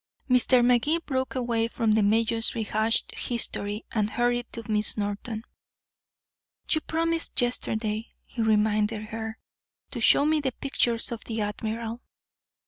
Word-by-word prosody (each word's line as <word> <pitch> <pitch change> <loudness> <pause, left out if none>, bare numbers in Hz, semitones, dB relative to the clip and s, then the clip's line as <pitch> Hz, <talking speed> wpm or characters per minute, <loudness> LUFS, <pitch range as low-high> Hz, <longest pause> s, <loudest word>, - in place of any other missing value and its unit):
Mr. 250 -1 +4
Magee 250 +6 +3
broke 265 -6 -3
away 235 -3 0
from 230 -1 0
the 215 0 +3
mayor's 225 +2 +2
rehashed 220 0 0
history, 215 -3 -2
and 215 -2 +1
hurried 240 +1 -1
to 230 - -6
Miss 215 0 +2
Norton. 210 +2 -4 1.3
"You 315 - +4
promised 330 -1 0
yesterday," 220 -3 0 0.2
he 235 - -5
reminded 215 0 +1
her, 220 0 -5 0.5
"to 240 - -5
show 280 - +5
me 310 0 +3
the 265 -3 -2
pictures 240 -4 0
of 230 -2 -5
the 225 -1 -3
admiral." 220 +3 -4
230 Hz, 135 wpm, -26 LUFS, 215-245 Hz, 1.3 s, show